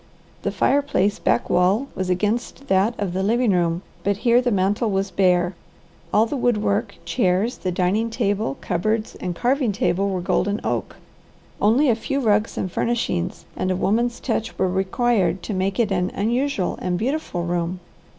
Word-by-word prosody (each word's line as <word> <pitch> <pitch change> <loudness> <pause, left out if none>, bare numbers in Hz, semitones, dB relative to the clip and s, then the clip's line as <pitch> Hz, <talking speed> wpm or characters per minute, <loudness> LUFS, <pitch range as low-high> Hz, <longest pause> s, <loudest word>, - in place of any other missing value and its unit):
The - - -1
fireplace 275 -8 +1
backwall 180 - +2
was 185 -1 -3
against 215 +8 -1
that 195 +5 +2
of 195 -4 -2
the 190 - -1
living 230 +3 +2
room, 175 -1 +1 0.2
but 200 -1 +1
here 240 +1 +5
the 250 - 0
mantel 205 +2 +1
was 195 -1 -1
bare. 180 -1 +2 0.6
All 215 +2 +4
the 260 - -4
wood 245 -4 +2
work, 205 +1 -1
chairs, 185 +7 +1
the 185 - -2
dining 190 +6 +1
table, 205 - -1
cupboards, 215 +5 -1
and 180 -1 -3
carving 250 - +1
table 195 0 0
were 190 -2 -1
golden 200 +3 0
oak. - - -2 0.7
Only 240 +8 +4
a 240 - +5
few 275 +5 -2
rugs 215 -3 +1
and 185 - -2
furnishings 230 - -1
and 185 - -1
a 185 - +1
woman's 235 +6 0
touch 225 -3 -2
were 185 - +2
required 190 +1 +1
to 215 - -4
make 195 +3 -1
it 220 -4 +2
an 180 -1 +1
unusual 235 0 0
and 180 -1 -1
beautiful 245 - -2
room. 175 +1 -2
200 Hz, 170 wpm, -22 LUFS, 185-235 Hz, 0.7 s, here